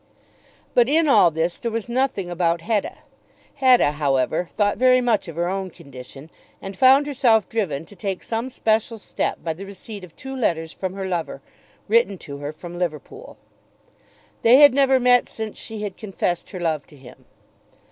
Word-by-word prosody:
But 245 0 +4
in 320 +2 +3
all 225 -10 +6
this 165 +2 -2
there 235 - -3
was 230 0 -4
nothing 240 -7 -1
about 170 -1 0
Hetta. 210 +2 -2 0.5
Hetta, 255 - +4
however, 145 +3 0
thought 205 0 +1
very 255 0 +5
much 235 -6 0
of 165 - -8
her 170 +1 -1
own 190 0 -3
condition, 140 -2 -12 0.3
and 195 0 -8
found 265 +6 +5
herself 245 -7 +2
driven 170 -9 -2
to 205 - -16
take 195 -2 -4
some 230 +3 -3
special 225 -2 0
step 210 - -4
by 165 - -2
the 180 +5 -10
receipt 200 +1 -9
of 175 -3 -13
two 265 0 -8
letters 165 -10 -1
from 185 0 -5
her 195 -1 -4
lover, 170 -6 -3 0.5
written 220 -3 +2
to 140 -4 -9
her 145 +1 -5
from 175 +2 -10
Liverpool. 180 - -6 1.0
They 235 +3 +6
had 285 -2 +8
never 270 -1 +3
met 245 0 +3
since 220 -1 -7
she 220 -2 -6
had 200 -3 -5
confessed 185 -4 -3
her 185 - -7
love 160 -4 -2
to 150 - -17
him. 130 -1 -16
195 Hz, 180 wpm, -22 LUFS, 165-240 Hz, 1.0 s, had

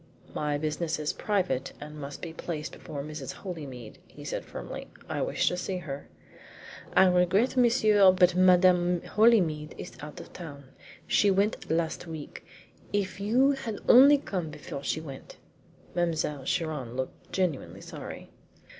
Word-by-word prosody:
"My 150 -1 -1
business 155 +2 -2
is 150 -1 -2
private, 180 -11 -1
and 150 0 -9
must 140 0 -7
be 165 -2 -5
placed 155 -2 -5
before 140 -2 -7
Mrs. 145 -3 -6
Holymead," 140 - -8
he - - -13
said - - -3
firmly. - - -7 0.2
"I - - -2
wish - - 0
to - - -2
see 185 +1 -3
her." 145 -6 -6 0.9
"I - - +8
regret, 185 +7 +3
monsieur, 215 -6 +5
but 180 -1 +4
Madame 180 -1 +4
Holymead 175 -10 +3
is - - -8
out 150 0 -8
of - - -11
town. 145 -5 -9 0.4
She 205 - +3
went 200 +2 +1
last 165 +1 -1
week. 160 -3 -8 0.5
If 195 -2 -1
you 245 +7 +3
had 270 -6 -4
only 275 +4 +9
come 185 - -4
before 140 -2 -7
she 155 - -1
went" 140 -4 -10 0.6
Mademoiselle 160 -5 -1
Chiron 150 -8 -2
looked 130 0 -6
genuinely 180 -7 -2
sorry. - - -9
175 Hz, 145 wpm, -28 LUFS, 150-195 Hz, 0.9 s, only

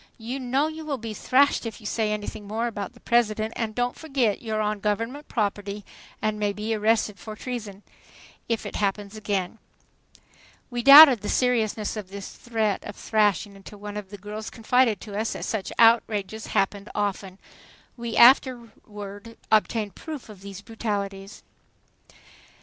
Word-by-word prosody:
"You 240 +4 -5
know 260 +3 +1
you 315 0 -7
will 295 -3 -3
be 225 -2 -6
thrashed 275 +6 +3
if 230 -2 -6
you 215 - -15
say 215 0 0
anything 210 0 -5
more 220 +3 -2
about 220 0 -4
the 240 - -18
President; 220 -2 +1
and 220 -2 -3
don't 245 0 0
forget 270 -9 0
you're 220 -2 -2
on 210 -1 -1
Government 230 +8 -2
property 205 -2 -2 0.4
and 215 0 0
may 205 -1 0
be 215 +2 -3
arrested 215 -2 +1
for 215 +2 -8
treason 215 -5 -6 0.7
if 230 -1 -1
it - - -5
happens 200 0 -2
again." 205 -1 -3 1.1
We 240 0 -2
doubted 275 -3 +10
the 205 - -4
seriousness 225 -4 +1
of 210 -4 -6
this 200 0 -8
threat 220 -4 -2
of 205 - -8
thrashing 210 -2 +1
until 195 +1 -12
one 205 0 -8
of 205 -2 -6
the 205 - -9
girls 210 +2 -7
confided 235 -2 +2
to 205 -2 -8
us 220 +2 -1
that - - -5
such 215 -4 -3
outrages 220 -2 +3
happened 200 +1 -1
often. 195 -2 -2 0.6
We 235 -2 -5
afterward 230 -4 +2
obtained 215 -1 +2
proof 300 - -8
of 205 -3 -12
these 200 0 -9
brutalities. 200 -3 -4
215 Hz, 160 wpm, -25 LUFS, 205-235 Hz, 1.1 s, doubted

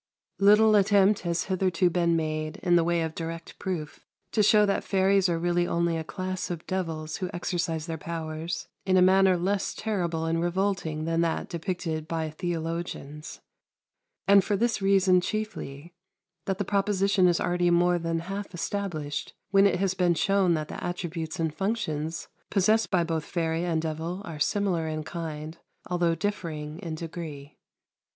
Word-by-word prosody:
Little 210 +2 +6
attempt 200 0 +4
has 170 -1 -1
hitherto 185 -1 +1
been 170 -1 +2
made, 155 -1 -2
in 175 -2 +4
the 170 - +5
way 170 0 +1
of 160 -1 -3
direct 165 0 -6
proof, 170 -6 -4 0.3
to 215 - +2
show 210 0 +6
that 200 - 0
fairies 195 -1 +3
are 170 - +1
really 175 +1 +1
only 170 0 +1
a 160 - -2
class 185 +2 -4
of 170 -2 -5
devils 160 -4 -3
who 185 -2 -3
exercise 170 -3 -2
their 165 -2 -5
powers 160 +1 -4 0.2
in 185 -1 +3
a - - +6
manner 190 0 +5
less 190 +3 -1
terrible 175 -7 -1
and 165 0 0
revolting 175 -3 -1
than 165 0 +1
that 165 -1 -1
depicted 165 -2 -3
by 160 -1 -2
theologians; 165 -3 -5 0.9
and 200 -1 +7
for 205 +1 0
this 235 0 0
reason 190 -2 +4
chiefly 175 -7 -5 0.5
that 195 -1 0
the 205 - -2
proposition 200 -1 +2
is 175 -1 +3
already 175 0 +1
more 175 0 +3
than 165 0 -1
half 195 +2 -6
established 160 -7 -3 0.2
when 195 0 +6
it 180 - 0
has 195 -1 +1
been 180 -2 +2
shown 190 0 +3
that 155 -1 -3
the - - -7
attributes 170 -1 -4
and 160 -2 0
functions 165 -6 -2 0.2
possessed 215 +3 +3
by 180 -3 +2
both 165 -2 -2
fairy 165 -1 -1
and 165 -2 0
devil 165 +4 -3
are 160 -5 -7
similar 180 -1 +1
in 155 0 -3
kind, 160 -1 -6 0.3
although 175 -2 +1
differing 165 -6 -4
in 165 -2 -5
degree. 155 -3 -7
175 Hz, 165 wpm, -27 LUFS, 160-190 Hz, 0.9 s, and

